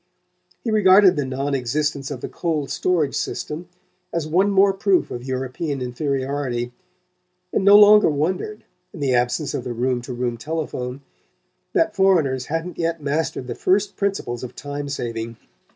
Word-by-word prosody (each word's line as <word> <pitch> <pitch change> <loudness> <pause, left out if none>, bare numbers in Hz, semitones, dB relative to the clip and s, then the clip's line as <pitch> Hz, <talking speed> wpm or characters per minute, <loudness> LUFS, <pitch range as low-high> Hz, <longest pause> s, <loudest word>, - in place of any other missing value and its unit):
He 230 - -1
regarded 195 -2 +6
the 145 -3 -1
non 135 +2 -2
existence 140 +2 -1
of 135 -4 -6
the - - -4
cold 155 -5 -2
storage 170 -6 +1
system 165 +4 -4 0.4
as 170 -2 -2
one 185 +6 +3
more 195 0 +4
proof 195 -1 +1
of 120 - -5
European 130 +3 -3
inferiority, 130 -1 -2 0.8
and - - +1
no 200 +1 +8
longer 210 -1 +7
wondered, 180 - -2 0.3
in - - -9
the 135 -3 +1
absence 125 +5 0
of 125 - -3
the 120 - -4
room 125 +1 0
to 120 - -8
room 120 -1 -2
telephone, 140 -3 -4 0.7
that - - +2
foreigners 160 -10 +2
hadn't 165 +2 -4
yet 165 0 -1
mastered 145 -2 -1
the 120 - -4
first 195 - +1
principles 195 - -2
of 125 - -7
time 145 0 -5
saving. 115 -3 -4
145 Hz, 155 wpm, -22 LUFS, 125-180 Hz, 0.8 s, no